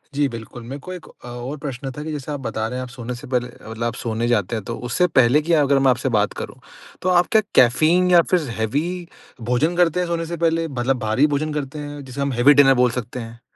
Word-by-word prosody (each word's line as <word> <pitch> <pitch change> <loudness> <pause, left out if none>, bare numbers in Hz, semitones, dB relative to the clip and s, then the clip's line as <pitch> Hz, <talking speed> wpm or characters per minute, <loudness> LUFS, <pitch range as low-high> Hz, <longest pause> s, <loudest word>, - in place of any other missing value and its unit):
जी 145 0 +2
बिल्कुल। 115 +1 -9
मेरे 135 +5 -7
को 185 - -6
1 180 - -9 0.2
अ, - - -9
और 120 +4 -6
प्रश्न 135 -2 -5
था 150 - -5
कि 155 - -5
जैसे 150 0 -5
आप 145 - -3
बता 115 -3 -3
रहे 125 - -5
हैं 130 - -3
आप 125 - -8
सोने 125 0 -6
से 120 - -10
पहले 125 -1 0
अ, 120 - -14
मतलब 115 +1 -5
आप 115 -1 -1
सोने 115 0 -2
जाते 115 -2 +1
हैं 110 - -4
तो 115 - -4
उससे 180 +7 +2
पहले 130 -2 +4
की 165 +3 0
अगर 140 -3 +4
मैं 135 -1 +4
आपसे 125 +1 -1
बात 105 - +1
करूँ, - - -7 0.4
तो 185 - 0
आप 180 -1 +4
क्या 220 - +5
कैफ़ीन 155 +9 +4
या 175 - +8
फ़िर 180 - +4 0.2
हेवी 110 +7 0 0.7
भोजन 155 +8 +2
करते 175 0 +3
हैं 180 - 0
सोने 170 -1 -2
से 170 +1 -5
पहले? 165 0 +1
मतलब 130 -1 -1
भारी 110 +6 +2
भोजन 150 +1 -1
करते 150 0 -4
हैं, 145 -1 -7
जिसे 130 +2 -6
हम 140 0 0
हेवी 125 +4 +6
डिनर 140 -1 +6
बोल 125 - +3
सकते 125 +1 -5
हैं? 115 0 -9
135 Hz, 260 wpm, -21 LUFS, 120-155 Hz, 0.7 s, या